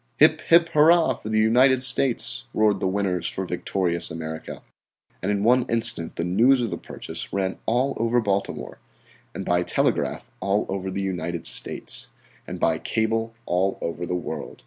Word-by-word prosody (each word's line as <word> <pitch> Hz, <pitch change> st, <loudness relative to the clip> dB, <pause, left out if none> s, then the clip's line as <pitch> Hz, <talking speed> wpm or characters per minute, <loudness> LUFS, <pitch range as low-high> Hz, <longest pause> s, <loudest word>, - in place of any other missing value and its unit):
"Hip, 155 Hz, +1 st, +5 dB
hip, 170 Hz, 0 st, +5 dB
hurrah 160 Hz, -1 st, +5 dB
for 110 Hz, -, -9 dB
the 110 Hz, -, 0 dB
United 125 Hz, +4 st, +4 dB
States," 130 Hz, -1 st, +2 dB
roared 105 Hz, -2 st, +3 dB
the 95 Hz, -, 0 dB
winners 95 Hz, -2 st, -1 dB
for 95 Hz, -, -4 dB
victorious 90 Hz, -1 st, -2 dB
America. 80 Hz, 0 st, -7 dB, 0.6 s
And -, -, -1 dB
in 100 Hz, 0 st, -1 dB
one 125 Hz, +3 st, +4 dB
instant 115 Hz, -7 st, +1 dB
the -, -, -2 dB
news 115 Hz, +10 st, +3 dB
of 115 Hz, -4 st, -2 dB
the 85 Hz, -, -3 dB
purchase -, -, -7 dB
ran 95 Hz, -1 st, -2 dB
all 125 Hz, +4 st, +1 dB
over 115 Hz, +2 st, +1 dB
Baltimore, 100 Hz, -3 st, -3 dB, 0.6 s
and -, -, -5 dB
by 90 Hz, 0 st, +2 dB
telegraph -, -, -1 dB
all 100 Hz, +2 st, 0 dB
over 95 Hz, 0 st, -3 dB
the 100 Hz, +1 st, -3 dB
United 85 Hz, -3 st, -3 dB
States, -, -, -1 dB, 0.4 s
and -, -, -6 dB
by -, -, +1 dB
cable 115 Hz, +1 st, -1 dB
all 95 Hz, +2 st, 0 dB
over 85 Hz, +1 st, -4 dB
the 90 Hz, -, -2 dB
Old 90 Hz, -, -4 dB
World. -, -, -6 dB
105 Hz, 170 wpm, -24 LUFS, 90-120 Hz, 0.6 s, Hip